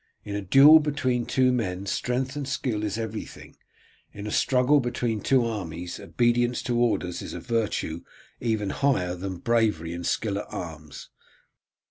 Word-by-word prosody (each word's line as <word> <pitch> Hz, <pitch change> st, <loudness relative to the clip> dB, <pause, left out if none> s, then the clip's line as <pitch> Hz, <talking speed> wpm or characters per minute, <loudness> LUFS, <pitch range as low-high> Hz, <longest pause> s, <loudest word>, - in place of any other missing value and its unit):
In 100 Hz, -, -4 dB
a 105 Hz, -, -2 dB
duel 140 Hz, -, +8 dB
between 130 Hz, -5 st, -1 dB
two 130 Hz, +1 st, +3 dB
men 100 Hz, -6 st, -2 dB
strength 125 Hz, +6 st, -2 dB
and 145 Hz, -2 st, -4 dB
skill 125 Hz, -6 st, -2 dB
is 105 Hz, 0 st, -2 dB
everything; 110 Hz, -1 st, -7 dB, 0.6 s
in 105 Hz, 0 st, -8 dB
a 105 Hz, -, -4 dB
struggle 130 Hz, +5 st, +3 dB
between 120 Hz, -3 st, -2 dB
two 130 Hz, +1 st, +3 dB
armies 90 Hz, -6 st, -5 dB
obedience 120 Hz, 0 st, +1 dB
to 120 Hz, -1 st, 0 dB
orders 100 Hz, -7 st, 0 dB
is -, -, -7 dB
a -, -, -5 dB
virtue 105 Hz, -8 st, -2 dB, 0.4 s
even 110 Hz, -4 st, -1 dB
higher 110 Hz, -11 st, +1 dB
than 95 Hz, +1 st, -5 dB
bravery 105 Hz, -7 st, 0 dB
and 85 Hz, 0 st, -6 dB
skill 100 Hz, -3 st, -1 dB
at -, -, -7 dB
arms. 80 Hz, -4 st, -8 dB
115 Hz, 155 wpm, -26 LUFS, 95-125 Hz, 0.6 s, duel